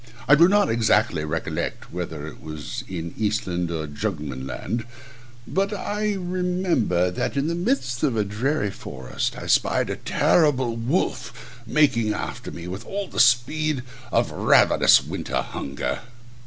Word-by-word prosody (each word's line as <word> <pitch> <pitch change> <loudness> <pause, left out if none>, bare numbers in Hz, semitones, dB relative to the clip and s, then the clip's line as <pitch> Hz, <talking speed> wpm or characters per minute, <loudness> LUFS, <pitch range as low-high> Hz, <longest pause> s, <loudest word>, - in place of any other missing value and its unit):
I 140 - +7
do 165 +4 +8
not 205 +1 +4
exactly 110 -8 +2
recollect 75 +1 -3
whether 80 -4 -4
it 80 - -10
was 75 -5 -6
in 85 -3 -5
Eastland 95 -5 -1
or 80 -2 -3
Jugemanland, 75 - -4 0.6
but 195 +2 0
I 210 +1 -1
remember 180 - 0
that 90 - -2
in 140 - +1
the 165 - 0
midst 175 - -1
of 135 -7 +1
a 105 - +3
dreary 110 +3 -1
forest 65 -8 -4
I - - -7
spied - - +2
a - - -2
terrible 130 -8 +2
wolf 120 -2 -3
making 115 -6 +3
after - - -5
me, 85 0 -8
with 95 +5 -6
all 200 +5 -4
the - - -4
speed 130 +4 +3 0.3
of - - +2
ravenous - - +5
winter - - -3
hunger. 70 0 -3
115 Hz, 140 wpm, -24 LUFS, -, 0.6 s, do